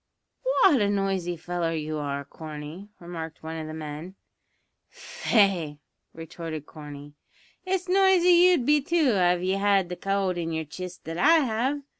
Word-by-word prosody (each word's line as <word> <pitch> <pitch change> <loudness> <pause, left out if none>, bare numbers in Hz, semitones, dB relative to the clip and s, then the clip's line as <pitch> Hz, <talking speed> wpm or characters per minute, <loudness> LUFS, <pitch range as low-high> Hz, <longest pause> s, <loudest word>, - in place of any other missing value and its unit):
"Wot 290 - +6
a 200 - +2
noisy 195 -3 -1
feller 170 0 -2
you 155 0 -3
are, 140 -1 -3
Corney," 155 +6 -9
remarked 165 -2 -8
one 160 +1 -5
of 155 -1 -5
the 155 - -7
men. 155 +4 -7 0.7
"Faix," 185 -9 0 0.3
retorted 165 -2 -7
Corney, 145 -2 -10 0.5
"it's 375 0 -1
noisy 375 -1 +4
you'd 350 -6 +5
be 295 +1 +4
too 315 -2 +2
av 180 -2 +2
ye 185 - +1
had 195 -2 +2
the 180 - -4
cowld 195 -2 -1
in 165 -1 -3
yer 160 0 -2
chist 180 +4 -8
that 165 +1 -5
I 325 - +6
have. 260 +5 -1
180 Hz, 155 wpm, -26 LUFS, 160-220 Hz, 0.7 s, Wot